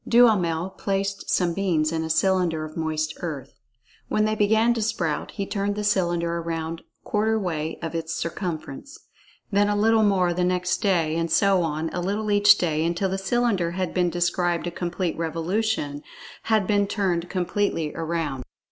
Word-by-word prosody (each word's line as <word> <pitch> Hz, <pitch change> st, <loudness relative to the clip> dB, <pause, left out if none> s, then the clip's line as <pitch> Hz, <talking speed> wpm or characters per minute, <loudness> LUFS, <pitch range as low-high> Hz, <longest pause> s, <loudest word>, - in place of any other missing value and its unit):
Duhamel 190 Hz, -8 st, +3 dB
placed 195 Hz, 0 st, -2 dB
some 175 Hz, -2 st, +2 dB
beans 165 Hz, -5 st, +1 dB
in 160 Hz, -1 st, -1 dB
a 160 Hz, -, -4 dB
cylinder 175 Hz, -2 st, +1 dB
of 155 Hz, -, -10 dB
moist 155 Hz, -1 st, -2 dB
earth. 150 Hz, -7 st, -6 dB, 0.5 s
When 215 Hz, -, +1 dB
they 215 Hz, -, +1 dB
began 220 Hz, +2 st, +3 dB
to 230 Hz, -, -2 dB
sprout, 170 Hz, -8 st, -1 dB
he 200 Hz, -, -3 dB
turned 200 Hz, 0 st, -2 dB
the 210 Hz, -, -3 dB
cylinder 175 Hz, -4 st, +1 dB
around 165 Hz, 0 st, -4 dB, 0.2 s
quarter 220 Hz, +1 st, +1 dB
way 165 Hz, -6 st, -3 dB
of 165 Hz, -, -4 dB
its 165 Hz, -1 st, -3 dB
circumference; 170 Hz, -, -5 dB, 0.5 s
then 205 Hz, +1 st, +3 dB
a 205 Hz, -, +1 dB
little 220 Hz, +2 st, +4 dB
more 190 Hz, -4 st, +3 dB
the 180 Hz, +1 st, 0 dB
next 180 Hz, 0 st, 0 dB
day; 170 Hz, -6 st, +1 dB
and 165 Hz, 0 st, -1 dB
so 190 Hz, +3 st, +3 dB
on, 160 Hz, 0 st, -2 dB
a 175 Hz, -, -2 dB
little 205 Hz, +3 st, -1 dB
each 205 Hz, 0 st, +6 dB
day, 160 Hz, -3 st, 0 dB
until 170 Hz, +3 st, 0 dB
the 190 Hz, +1 st, -2 dB
cylinder 195 Hz, -5 st, 0 dB
had 185 Hz, -1 st, -2 dB, 0.2 s
described 175 Hz, 0 st, 0 dB
a 175 Hz, -, -3 dB
complete 175 Hz, 0 st, -2 dB
revolution—had 170 Hz, +3 st, -2 dB
been 205 Hz, 0 st, +2 dB
turned 180 Hz, -4 st, -1 dB
completely 180 Hz, -4 st, -1 dB
around. 160 Hz, -5 st, -3 dB
180 Hz, 165 wpm, -24 LUFS, 165-205 Hz, 0.5 s, each